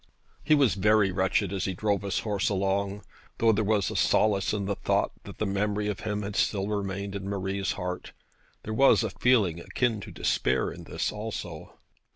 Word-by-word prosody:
He 155 - +4
was 140 -5 +4
very 105 0 +3
wretched 95 +1 +1
as 95 -1 -1
he 95 - -2
drove 100 0 0
his 100 -2 -1
horse 105 -3 0
along. 100 0 -1 0.3
Though 115 -1 +4
there 110 0 +1
was 105 -2 +1
a - - -6
solace 100 -3 +2
in 100 -2 -2
the 100 - 0
thought - - 0
that - - -10
the 110 - -1
memory 105 +1 0
of 105 0 -3
him 105 -1 -3
had 100 0 -5
still 100 -2 +1
remained 100 -1 -3
in 100 0 -4
Marie's 95 0 -2
heart, 90 -1 -5 0.5
there 110 - -4
was 135 0 +5
a 110 - -2
feeling 105 -10 +2
akin 115 +3 -1
to - - -8
despair - - 0
in - - -10
this - - -2
also. 105 -7 -6
100 Hz, 195 wpm, -27 LUFS, 95-105 Hz, 0.5 s, was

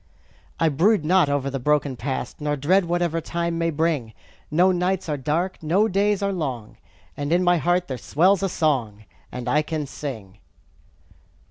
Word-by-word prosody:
I 165 - +3
brood 170 +4 +2
not 180 -2 +4
over 140 -1 -1
the 135 - -3
broken 145 0 +1
past, 130 +4 -5
Nor 150 0 0
dread 180 +7 +2
whatever 170 -1 0
time 170 +1 -2
may 165 0 +1
bring; 155 -7 -1 0.4
No 180 +5 +4
nights 180 +1 -1
are 150 - -1
dark, 155 +7 -2
no 180 +7 +2
days 200 0 +1
are 200 0 0
long, 130 - -4 0.4
While 145 +1 -4
in 175 +2 +3
my 175 0 +4
heart 175 +2 +1
there 130 -2 -5
swells 185 - +2
a 195 - 0
song, 120 - -1 0.3
And 125 -1 -6
I 150 +5 +3
can 155 -1 -3
sing. 110 -9 -7
160 Hz, 170 wpm, -23 LUFS, 140-180 Hz, 0.4 s, not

